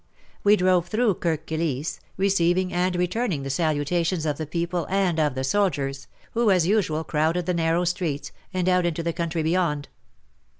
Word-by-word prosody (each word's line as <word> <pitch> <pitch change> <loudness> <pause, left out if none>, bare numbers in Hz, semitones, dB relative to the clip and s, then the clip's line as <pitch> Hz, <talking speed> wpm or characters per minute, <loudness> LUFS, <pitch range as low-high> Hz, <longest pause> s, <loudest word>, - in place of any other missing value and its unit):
We 205 +1 +6
drove 180 -3 +2
through 220 -1 +2
Kirk 160 -2 -1
Kilisse, 155 -2 -2 0.2
receiving 185 -1 +2
and 180 +1 +1
returning 180 - -1
the 135 - -4
saluta 155 +3 0
tions 165 -1 -1
of 150 -1 -1
the 155 - -3
people 170 +2 -2
and 185 -4 +1
of 150 -4 +1
the 130 - -2
soldiers, 135 -5 0 0.2
who 230 -1 +2
as 180 -4 +4
usual 175 -6 +1
crowded 160 +3 0
the 180 - 0
narrow 165 +1 +1
streets, 170 -5 -2 0.2
and 185 -1 -1
out 180 -1 +3
into 165 0 -2
the 170 0 -1
country 170 -1 -2
beyond. 160 -4 0
170 Hz, 175 wpm, -24 LUFS, 155-185 Hz, 0.2 s, We